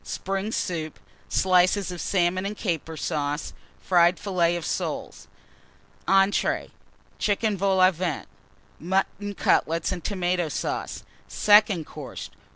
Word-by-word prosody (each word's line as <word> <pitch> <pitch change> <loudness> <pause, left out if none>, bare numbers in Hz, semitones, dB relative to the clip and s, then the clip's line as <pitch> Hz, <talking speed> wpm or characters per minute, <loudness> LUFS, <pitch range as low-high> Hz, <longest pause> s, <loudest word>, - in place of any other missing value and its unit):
Spring 195 +3 -3
Soup. 160 -7 -3 0.3
Slices 185 +1 +3
of 175 - -6
Salmon 185 -1 +1
and 205 +1 -4
Caper 165 -4 -3
Sauce. 145 -1 -2 0.3
Fried 175 -1 +3
Filleted 175 -4 0
Soles. - - -4 0.8
ENTREES. 195 +1 +2 0.5
Chicken 210 +1 +1
Vol 195 0 +1
au 185 0 +6
Vent. 170 -3 -3 0.5
Mutton 195 +3 -1
Cutlets 165 -1 +1
and 180 -2 -4
Tomato 180 -4 -1
Sauce. - - -4 0.2
SECOND 205 -5 +4
COURSE. 145 -3 -8
185 Hz, 110 wpm, -25 LUFS, 170-195 Hz, 0.8 s, au